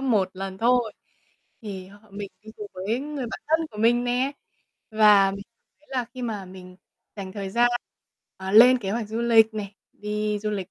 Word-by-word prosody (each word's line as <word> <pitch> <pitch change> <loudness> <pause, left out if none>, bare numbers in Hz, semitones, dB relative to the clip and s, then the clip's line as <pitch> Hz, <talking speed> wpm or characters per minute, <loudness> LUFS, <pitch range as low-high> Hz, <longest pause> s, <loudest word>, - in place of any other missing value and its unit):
1 215 -8 +1
lần 190 0 -6
thôi. 240 -1 +2 0.7
Thì 190 -4 -7 0.2
mình 200 0 -6
đi 220 - -11
cùng 210 -1 -7
với 210 +7 -2
người 290 -3 -5
bạn - - -6
thân 320 +1 +2
của 210 - -11
mình 240 +2 +3
nè. 250 +3 0 0.6
Và 210 -3 +6
mình 200 +1 -6
cảm 230 +2 -54
thấy 300 - -28
là 255 -3 -1
khi 255 - -6
mà 210 -5 -3
mình 185 0 -12 0.4
dành 190 -2 -6
thời 195 -1 -5
gian, 240 +3 +3 0.7
ờ, 190 0 -5
lên 250 +4 +8
kế 195 -4 -4
hoạch 220 0 -2
du 220 +2 -3
lịch 225 -2 +5
nè, 205 -2 -5 0.2
đi 210 0 -2
du 210 +1 -3
lịch 195 -3 -4
215 Hz, 195 wpm, -25 LUFS, 195-240 Hz, 0.7 s, lên